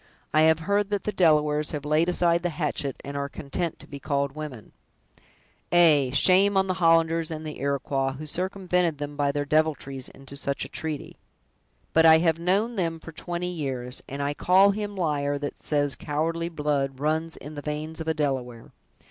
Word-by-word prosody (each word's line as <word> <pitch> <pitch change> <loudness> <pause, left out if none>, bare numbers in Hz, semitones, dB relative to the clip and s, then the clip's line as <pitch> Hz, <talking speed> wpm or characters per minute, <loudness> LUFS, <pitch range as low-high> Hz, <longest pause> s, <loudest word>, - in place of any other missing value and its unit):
I 155 - +5
have 160 0 +2
heard 200 +4 +1
that 205 -2 -1
the 210 - -1
Delawares 150 -5 +2
have 145 -1 -4
laid 155 +3 +2
aside 170 -1 +2
the 175 - -1
hatchet, 150 -4 -2
and 140 +1 -6
are 140 0 -2
content 150 +4 -4
to - - -14
be 140 - -8
called 140 -1 -1
women!" 145 -6 -8 1.0
"Aye, 155 -6 +5
shame 190 +7 +4
on 190 - +4
the 185 - 0
Hollanders 165 -1 +3
and 155 -1 -5
Iroquois, 140 -2 -1
who 150 +3 -8
circumvented 180 -1 -1
them 145 0 -5
by 145 -1 +1
their 145 0 -2
deviltries, 145 -3 0
into 135 0 -13
such 140 0 -2
a - - -10
treaty! 155 -2 -5 0.8
But 165 0 +6
I 160 0 +9
have 165 0 +1
known 200 +7 +1
them 165 -3 -1
for 160 - -10
twenty 175 +2 -4
years, 130 -6 -4
and 140 +1 -4
I 145 +1 -1
call 190 +6 +5
him 205 0 -4
liar 145 -5 0
that 145 0 -6
says 145 -2 +1
cowardly 165 +3 -2
blood 145 -4 -1
runs 160 +2 -1
in 150 +2 -9
the 145 - -6
veins 155 +2 -4
of 160 - -6
a 160 - +1
Delaware. 130 -6 -3
155 Hz, 185 wpm, -26 LUFS, 140-170 Hz, 1.0 s, I